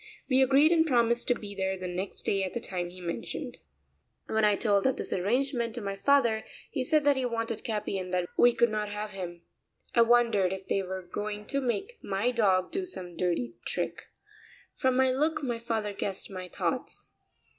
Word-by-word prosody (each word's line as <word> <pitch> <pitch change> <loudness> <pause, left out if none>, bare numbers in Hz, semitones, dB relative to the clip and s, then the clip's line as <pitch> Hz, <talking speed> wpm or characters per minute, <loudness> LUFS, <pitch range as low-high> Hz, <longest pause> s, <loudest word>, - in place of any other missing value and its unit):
We 265 -1 +4
agreed 275 +4 +5
and 330 -2 +5
promised 240 -5 +3
to 245 - +4
be 205 -3 -7
there 190 -1 -1
the 185 0 -5
next 180 +2 -4
day 195 -1 +1
at 185 - -3
the - - -2
time 180 -5 -3
he 180 +1 -12
mentioned. 170 -2 -5 0.7
When 220 0 0
I 210 -1 +5
told 200 +1 +2
of 265 - +1
this - - -3
arrangement 235 +4 0
to 240 - -4
my 200 -1 -3
father 235 -1 +3 0.3
he 265 - -1
said 305 +3 +3
that 285 -1 +4
he 260 - 0
wanted 230 -2 -2
Capi 210 -3 -2
and 185 -1 -6
that 180 -1 0
we 245 - +6
could 235 -1 +3
not 210 -1 -2
have 210 0 -4
him. 175 -3 -7 0.5
I 235 - +5
wondered 230 -5 +4
if 190 0 -7
they 195 - +1
were 190 0 -5
going 210 +3 -5
to 275 0 0
make 395 - -2
my 200 +5 0
dog 195 -6 +2
do 385 - -1
some 180 - -8
dirty 165 -10 -1
trick. 170 -1 -2 0.7
From 260 -1 +1
my 260 0 +4
look 305 +3 0
my 240 -3 -2
father 220 -3 -2
guessed 195 0 -3
my 185 -1 -6
thoughts. - - -3
215 Hz, 200 wpm, -29 LUFS, 190-250 Hz, 0.7 s, we